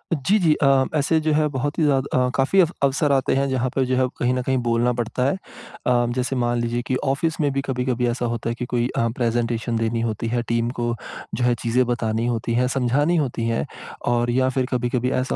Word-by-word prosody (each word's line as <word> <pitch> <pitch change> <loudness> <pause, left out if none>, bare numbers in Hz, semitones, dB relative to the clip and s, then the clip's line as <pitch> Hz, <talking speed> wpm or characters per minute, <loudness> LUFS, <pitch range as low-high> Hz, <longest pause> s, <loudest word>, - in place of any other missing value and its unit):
जी, 150 +10 +2
जी। 160 -4 +4
अ, 135 -1 +4
ऐसे 155 +2 +2
जो 155 - +2
है 150 0 +3
बहुत 145 +1 -3
ही - - +3
ज़्या 145 -3 +3
अ, 130 -1 0
काफ़ी 140 +9 +2
अफ 170 -2 +2
अवसर 140 +2 +2
आते 135 -1 +2
हैं 140 +1 +1
जहाँ 130 -1 0
पर 135 - +2
जो 130 0 0
है 130 0 +3
कहीं 125 +1 +1
न 130 - 0
कहीं 130 +1 0
बोलना 120 +1 +2
पड़ता 120 +1 -2
है। 140 - +2 0.5
अ, 120 -1 +3
जैसे 130 +1 -1
मान 120 -1 0
लीजिए 120 +1 -1
कि 130 - 0
ऑफ़िस 150 +4 0
में 145 -2 +2
भी 135 - 0
कभी-कभी 125 -2 -1
ऐसा 120 +1 -1
होता 115 -1 -2
है 115 - -2
कि 125 - -2
कोई 120 0 +2
अ, 115 - +2
प्रेज़ेटेशन 115 -1 -1
देनी 115 0 0
होती 115 0 -2
है, 120 +1 0
टीम 115 0 0
को 120 0 0 0.4
जो 125 - -2
है 120 0 +3
चीज़ें 125 +2 +2
बतानी 115 -2 -1
होती 115 -1 -1
हैं, 125 +2 +2
समझानी 135 +6 +1
होती 125 -6 -1
हैं 115 0 0 0.5
और 120 0 +1
या 130 +1 +2
फिर 130 -1 0
कभी-कभी 125 0 0
ऐसा 130 - -2
125 Hz, 235 wpm, -22 LUFS, 120-135 Hz, 0.5 s, जी